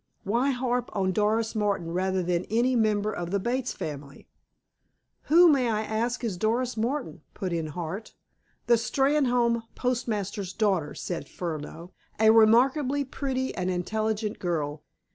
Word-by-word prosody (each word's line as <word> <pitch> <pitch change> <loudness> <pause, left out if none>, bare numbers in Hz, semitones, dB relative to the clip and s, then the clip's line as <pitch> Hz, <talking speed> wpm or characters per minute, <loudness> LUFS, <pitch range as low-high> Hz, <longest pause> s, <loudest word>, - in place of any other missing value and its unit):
Why 235 +7 +1
harp 245 -2 -1
on 190 -2 +1
Doris 215 +3 +1
Martin 200 -6 -1
rather 185 +1 0
than 175 0 0
any 240 +4 +1
member 215 -2 +1
of 175 -3 -4
the 200 +2 0
Bates 250 +5 -1
family?" 140 -2 -7 1.0
"Who, 345 +3 +7
may 270 -6 +3
I 215 -1 0
ask, 230 +4 -2
is 210 -6 -2
Doris 235 +5 0
Martin?" 245 +5 -2
put 185 -4 -3
in 165 -2 -2
Hart. 175 +7 -6 0.5
"The 235 - +5
Steynholme 245 -2 +2
postmaster's 210 -6 -2
daughter," 190 -9 0
said 175 -2 -5
Furneaux. 165 +1 -6 0.3
"A 220 0 +6
remarkably 260 +6 +4
pretty 260 -1 -3
and 180 0 -2
intelligent 215 +4 -2
girl. 150 -4 -2
215 Hz, 140 wpm, -27 LUFS, 185-245 Hz, 1.0 s, Who